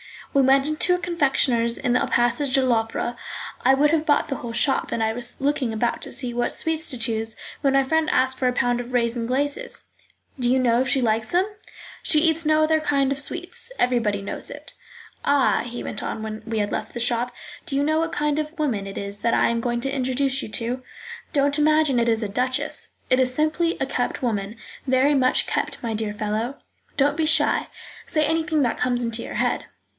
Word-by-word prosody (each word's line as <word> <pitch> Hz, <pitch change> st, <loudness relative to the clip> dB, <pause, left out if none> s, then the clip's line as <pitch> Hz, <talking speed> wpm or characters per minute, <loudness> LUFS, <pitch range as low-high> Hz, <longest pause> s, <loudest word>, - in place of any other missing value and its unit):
We 275 Hz, -, +4 dB
went 270 Hz, +1 st, +4 dB
into 310 Hz, +4 st, +1 dB
a -, -, -1 dB
confectioner's 270 Hz, -9 st, +1 dB
in 245 Hz, -, 0 dB
the 250 Hz, -, +2 dB
passage 245 Hz, +3 st, +1 dB
de 265 Hz, -1 st, +3 dB
l'Opera. 235 Hz, 0 st, 0 dB, 0.5 s
I 265 Hz, -, +6 dB
would 295 Hz, +2 st, +3 dB
have 320 Hz, -1 st, +1 dB
bought 295 Hz, 0 st, +2 dB
the 275 Hz, -, -2 dB
whole 235 Hz, -1 st, -6 dB
shop, 270 Hz, +4 st, +1 dB
and 225 Hz, -, 0 dB
I 220 Hz, -, +1 dB
was 245 Hz, +1 st, -4 dB
looking 270 Hz, -4 st, 0 dB
about 235 Hz, +2 st, -1 dB
to -, -, -7 dB
see 250 Hz, -1 st, -3 dB
what 240 Hz, 0 st, -1 dB
sweets 320 Hz, 0 st, -1 dB
to 255 Hz, -, +2 dB
choose, 225 Hz, -1 st, -1 dB, 0.2 s
when 275 Hz, -3 st, +1 dB
my 275 Hz, 0 st, +4 dB
friend 320 Hz, +3 st, +1 dB
asked 260 Hz, 0 st, +1 dB
for 255 Hz, -, +2 dB
a 250 Hz, -, +1 dB
pound 245 Hz, 0 st, +1 dB
of 245 Hz, +1 st, -7 dB
raisins 235 Hz, -1 st, 0 dB
glaces. 285 Hz, -, -2 dB, 0.6 s
"Do 245 Hz, -1 st, +1 dB
you 255 Hz, -, +4 dB
know 245 Hz, -1 st, +3 dB
if 260 Hz, -, -1 dB
she 265 Hz, -, +1 dB
likes 220 Hz, -1 st, +1 dB
them?" 360 Hz, +2 st, +3 dB, 0.6 s
"She 305 Hz, -4 st, +3 dB
eats 325 Hz, 0 st, +2 dB
no 310 Hz, 0 st, +3 dB
other 315 Hz, 0 st, +3 dB
kind 275 Hz, -3 st, +1 dB
of 275 Hz, -, -1 dB
sweets; 410 Hz, -, -3 dB
everybody 230 Hz, -5 st, +1 dB
knows -, -, -3 dB
it. -, -, -10 dB, 0.5 s
"Ah," 285 Hz, -2 st, +3 dB
he 240 Hz, 0 st, -6 dB
went -, -, -5 dB
on 220 Hz, -, -4 dB
when 215 Hz, 0 st, -5 dB
we 225 Hz, -1 st, -1 dB
had 205 Hz, 0 st, -1 dB
left 215 Hz, -, -4 dB
the -, -, -3 dB
shop, 240 Hz, +1 st, +1 dB, 0.4 s
"do 275 Hz, -, -3 dB
you 280 Hz, -, +2 dB
know 310 Hz, +2 st, +2 dB
what 330 Hz, 0 st, -1 dB
kind 295 Hz, 0 st, 0 dB
of 305 Hz, +2 st, -5 dB
woman 235 Hz, -11 st, -1 dB
it 195 Hz, -, -7 dB
is 200 Hz, 0 st, -5 dB
that 230 Hz, +1 st, +1 dB
I -, -, +3 dB
am 235 Hz, 0 st, 0 dB
going 240 Hz, 0 st, -1 dB
to 270 Hz, +1 st, -2 dB
introduce 265 Hz, 0 st, 0 dB
you -, -, -5 dB
to? 240 Hz, +4 st, -3 dB, 0.5 s
Don't 285 Hz, +1 st, +2 dB
imagine 305 Hz, -3 st, +3 dB
it 235 Hz, 0 st, +2 dB
is 225 Hz, 0 st, +1 dB
a 210 Hz, -, -3 dB
duchess. 250 Hz, +5 st, -2 dB, 0.2 s
It 255 Hz, -, +5 dB
is 255 Hz, -1 st, +2 dB
simply 310 Hz, +3 st, +1 dB
a -, -, +1 dB
kept 255 Hz, -1 st, -2 dB
woman, 210 Hz, -3 st, -2 dB, 0.3 s
very 260 Hz, +3 st, +3 dB
much 255 Hz, -2 st, +3 dB
kept, -, -, -2 dB
my 230 Hz, -1 st, -2 dB
dear 215 Hz, -1 st, -2 dB
fellow; 215 Hz, +5 st, -2 dB, 0.4 s
don't 285 Hz, +2 st, +2 dB
be 320 Hz, -, +1 dB
shy, 320 Hz, -, +3 dB, 0.4 s
say 310 Hz, -1 st, +1 dB
anything 315 Hz, -1 st, +1 dB
that 235 Hz, -, 0 dB
comes 245 Hz, -1 st, +1 dB
into 230 Hz, 0 st, -1 dB
your -, -, -7 dB
head." -, -, 0 dB
255 Hz, 220 wpm, -23 LUFS, 235-295 Hz, 0.6 s, I